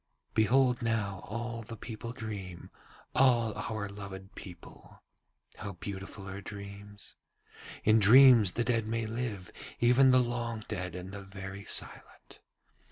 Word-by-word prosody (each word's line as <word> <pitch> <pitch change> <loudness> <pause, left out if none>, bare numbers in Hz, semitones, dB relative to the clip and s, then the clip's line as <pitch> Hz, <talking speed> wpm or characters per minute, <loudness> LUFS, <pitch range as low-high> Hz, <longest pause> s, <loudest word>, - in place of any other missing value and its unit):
'Behold 125 +3 +3
now 110 -5 -1
all 115 +1 -4
the 115 +1 -9
people 115 +2 -7
dream, 100 -7 -7 0.4
all 120 -4 +4
our 110 0 -4
loved 100 0 -9
people. 90 -5 -13 0.5
How 100 - -6
beautiful 95 +1 -7
are 100 +1 -6
dreams! 100 0 -10 0.7
In 110 +1 +5
dreams 115 -2 +7
the 120 - 0
dead 115 -3 0
may 115 0 -1
live, 110 -4 -4 0.3
even 125 +3 +5
the 130 - +6
long 120 -3 -1
dead 90 -4 -4
and 90 +1 -7
the 100 0 -7
very 95 0 -8
silent. - - -2
110 Hz, 130 wpm, -31 LUFS, 100-115 Hz, 0.7 s, dreams